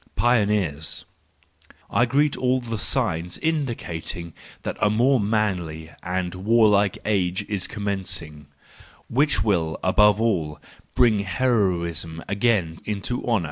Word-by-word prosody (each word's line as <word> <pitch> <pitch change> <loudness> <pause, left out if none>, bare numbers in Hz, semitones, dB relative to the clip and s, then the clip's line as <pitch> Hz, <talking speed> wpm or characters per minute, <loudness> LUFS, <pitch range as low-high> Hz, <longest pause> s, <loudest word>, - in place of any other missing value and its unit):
Pioneers 105 -10 +1 0.9
.—I 120 - +3
greet 145 +3 +2
all 130 0 +1
the 115 -3 -5
signs 85 -1 -1
indicating 115 - -3 0.3
that - - -3
a 105 - +4
more 125 +5 +3
manly 90 -7 -1
and 90 0 -2
warlike 105 0 +3
age 95 -3 0
is 100 -4 -2
commencing, 95 -8 -4 0.6
which 145 +5 +2
will, 85 -7 0
above 105 +2 +4
all, 85 -10 0 0.4
bring 115 -4 +4
heroism 90 - 0
again 100 -5 +1
into 105 +4 -3
honour! 115 -3 +3
100 Hz, 110 wpm, -24 LUFS, 85-115 Hz, 0.9 s, a